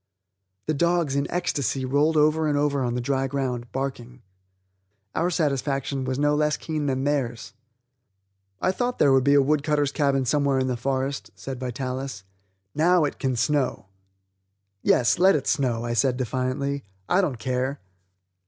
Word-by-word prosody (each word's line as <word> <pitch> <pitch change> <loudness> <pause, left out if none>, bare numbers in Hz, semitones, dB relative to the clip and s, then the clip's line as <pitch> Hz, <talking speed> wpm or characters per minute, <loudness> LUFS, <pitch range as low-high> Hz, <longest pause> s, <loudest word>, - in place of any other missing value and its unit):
The 155 - 0
dogs, 170 -2 +1
in 140 0 0
ecstasy, 140 -7 -1
rolled 145 +4 +2
over 155 +1 +3
and 145 -1 +1
over 145 -1 +1
on 120 -1 -1
the 125 - -1
dry 135 +1 0
ground, 125 -3 -3
barking. 130 -2 -5 0.9
Our 170 +2 +1
satisfaction 140 -4 -1
was 130 0 -2
no 145 +1 +2
less 150 0 +1
keen 155 -2 -3
than 130 -1 0
theirs. 135 -4 -2 1.1
"I 185 - +2
thought 245 +6 -2
there 140 - +4
would 135 -1 +4
be 140 +1 +4
a 140 - +6
wood 150 +1 +2
cutter's 145 -2 +1
cabin 140 -3 +1
somewhere 140 0 +2
in 130 - +1
the 130 -1 -1
forest," 135 +2 -2
said 135 -2 -7
Vitalis. 130 -2 -4 0.5
"Now, 170 +2 +3
it 145 - -4
can 130 -2 0
snow!" 130 -5 0 0.9
"Yes, 120 +7 +3
let 190 +2 +6
it 140 - -1
snow," 120 -4 0
I 120 - -2
said 125 +1 +2
defiantly; 130 +3 -2 0.2
"I 185 - +3
don't 150 -10 -1
care!" 130 +3 -2
140 Hz, 160 wpm, -25 LUFS, 130-150 Hz, 1.1 s, a